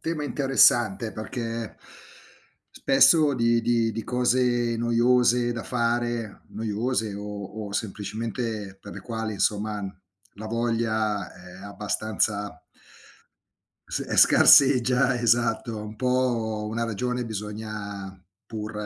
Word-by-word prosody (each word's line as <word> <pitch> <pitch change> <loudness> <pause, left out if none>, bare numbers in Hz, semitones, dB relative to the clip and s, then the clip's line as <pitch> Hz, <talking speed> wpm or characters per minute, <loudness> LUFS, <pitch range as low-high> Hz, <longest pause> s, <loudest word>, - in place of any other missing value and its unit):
tema 160 -2 -3
interessante 120 -6 +3
perché 115 0 -5 1.0
spesso 145 +2 +4
di 115 -1 +2
di 115 -1 +1
di 115 +1 -5
cose 125 -1 +1
noiose 120 +1 +2
da 115 -1 -5
fare 120 -2 -2
noiose 110 0 -2
o 105 +1 -7
o 100 - -8
semplicemente 105 0 -4
per 100 - -10
le - - -8
quali 115 -2 -4
insomma, 105 +1 -1 0.5
la 110 +2 -8
voglia 110 -2 -1
è 90 +1 -13
abbastanza 105 -1 -2 1.3
S - - -3
scarseggia, 130 -1 +5
esatto. 115 -1 +1
Un 105 +1 -8
po' 120 -3 -1
una 115 +2 -3
ragione 125 +3 -2
bisogna 105 -3 -6 0.2
pur 110 -1 -6
115 Hz, 100 wpm, -25 LUFS, 105-120 Hz, 1.3 s, scarseggia